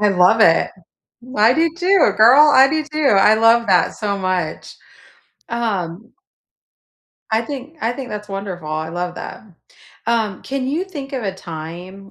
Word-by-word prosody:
I 210 - +3
love 190 +3 +3
it. 165 -7 +4 0.7
I 215 +3 +5
do 325 0 +1
too, 360 - +3
girl, 255 +8 +7
I 270 -2 +6
do 310 +2 -1
too, 295 -8 +2
I 210 +2 +5
love 230 +1 +3
that 185 -3 +2
so 200 -2 -3
much. 185 -4 -3 0.7
Um 220 -2 -4 1.2
I 220 +1 +1
think 285 +4 -8
I 230 +2 -1
think 255 0 -7
that's 210 -1 -7
wonderful, 195 -5 -6
I 155 +1 -3
love 175 +1 -4
that. - - -8 0.6
Um, 220 -4 -1
can 270 -1 -4
you 310 +7 -2
think 290 -7 -9
of 260 -3 -4
a 195 -2 -3
time 180 +3 -9
220 Hz, 160 wpm, -18 LUFS, 185-270 Hz, 1.2 s, girl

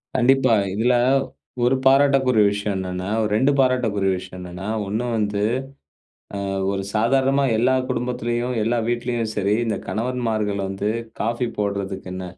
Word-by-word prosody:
கண்டிப்பா 130 -1 +4 0.2
இதுல 120 +5 +2 0.7
1 125 +2 +3
பாராட்டக்குரிய 135 -4 +4
விஷயம் 100 0 -2
என்னென்னா 90 0 -4 0.3
2 130 +6 +3
பாராட்டக்குரிய 115 -7 +2
விஷயம் 90 0 -9
என்னென்னா, 90 +2 -7 0.2
1 110 +5 -2
வந்து 105 -1 -1 1.0
ஆ - - -3 0.3
ஒரு 95 0 -2
சாதாரணமா 135 +5 +2
எல்லா 125 +3 +3
குடும்பத்துலயும், 120 0 -2
எல்லா 120 +2 +1
வீட்லையும் 120 -1 -1
சரி, 100 0 +1
இந்த 110 -3 -1
கணவன்மார்கள் 110 -4 -1
வந்து 95 +2 -2 0.3
காஃபி 120 +2 0
போடுறதுக்கு 100 -2 -3
என்ன, 95 0 -5
115 Hz, 125 wpm, -22 LUFS, 100-125 Hz, 1.0 s, கண்டிப்பா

